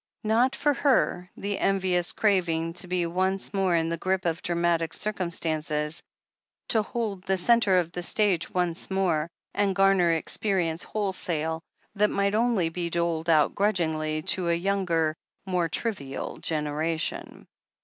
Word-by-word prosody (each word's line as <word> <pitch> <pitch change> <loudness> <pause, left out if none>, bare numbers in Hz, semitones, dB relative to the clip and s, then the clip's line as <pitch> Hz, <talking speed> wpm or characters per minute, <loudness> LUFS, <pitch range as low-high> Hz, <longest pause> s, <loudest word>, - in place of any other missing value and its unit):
Not 230 +4 +2
for 295 0 +2
her 250 -11 +1
the 200 0 -3
envious 185 -3 +1
craving 170 -5 +1
to 180 +1 -4
be 180 -1 0
once 190 +4 -1
more 190 -3 +2
in 165 0 +1
the 170 -1 -3
grip 190 +1 -1
of 165 0 -1
dramatic 170 -2 0
circum 200 -4 -1
stances, 155 -2 -1 0.7
to 220 - +3
hold 210 -3 -3
the 190 0 0
centre 205 -1 +4
of 170 -2 0
the 175 - -5
stage 185 -2 +2
once 180 -1 -1
more, 180 -5 0 0.2
and 200 -1 +1
gamer 195 -3 +4
experience 170 0 -1
wholesale, 165 -6 -2 0.3
that 210 0 +2
might 200 0 0
only 220 -6 +2
be 170 +1 -3
doled 170 -1 -1
out 155 -3 +4
grudgingly 160 -6 0
to 180 +1 0
a 170 0 +1
youngft, 175 -5 +1 0.3
more 180 -3 0
trivial 155 - -4
generation. 155 +1 -2
180 Hz, 145 wpm, -26 LUFS, 165-195 Hz, 0.7 s, centre